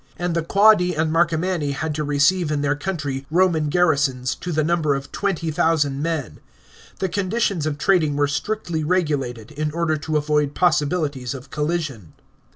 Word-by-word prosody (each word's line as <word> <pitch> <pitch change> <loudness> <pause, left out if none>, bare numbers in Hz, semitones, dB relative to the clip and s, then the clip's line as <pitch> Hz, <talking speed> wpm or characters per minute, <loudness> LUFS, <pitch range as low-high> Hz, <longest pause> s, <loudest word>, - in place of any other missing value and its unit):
And 175 -1 -2
the 170 - +1
Quadi 190 0 +4
and 155 0 0
Marcomanni 165 -2 +1
had 155 +2 -3
to 150 +1 -2
receive 150 +4 +2
in 145 -1 -1
their 145 0 +2
country 145 -5 -4
Roman 165 -3 +2
garrisons, 145 -7 +1
to 180 - -6
the 155 -1 +1
number 155 -3 +1
of 135 0 -6
20,000 160 -6 0
men. 160 -5 -3 0.6
The 190 - -1
conditioLs 195 -3 -1
of 150 -2 -2
trading 155 -3 +2
were 145 0 +2
strictly 160 +3 -2
regulated, 145 - -1
in 155 +1 -2
order 160 0 0
to 155 +1 -1
avoid 150 -1 0
possibilities 145 -6 0
of 135 +1 -11
collision. 150 - -3
155 Hz, 160 wpm, -22 LUFS, 145-175 Hz, 0.6 s, Quadi